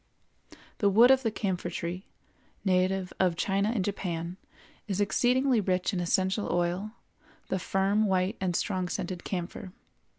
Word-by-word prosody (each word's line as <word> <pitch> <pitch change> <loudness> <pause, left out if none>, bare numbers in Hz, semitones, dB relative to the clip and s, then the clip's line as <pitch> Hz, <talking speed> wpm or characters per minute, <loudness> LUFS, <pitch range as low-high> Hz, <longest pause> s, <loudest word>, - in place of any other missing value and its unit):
The 205 - +4
wood 230 +6 +7
of 265 0 +5
the 230 - +1
Camphor 190 -5 -2
tree, 175 +2 -5 0.6
native 185 0 +1
of 180 -3 +2
China 195 +4 +1
and 215 -5 0
Japan, 175 -3 -3 0.5
is 200 -2 -2
exceedingly 250 +4 +2
rich 185 +1 0
in 185 - -1
essential 190 +4 0
oil, 175 +5 -1 0.6
the 190 - 0
firm, 195 +4 +1
white, 185 0 +1
and 180 -2 0
strong 185 -2 -1
scented 180 -2 -4
camphor. 180 0 -5
190 Hz, 140 wpm, -29 LUFS, 180-205 Hz, 0.6 s, wood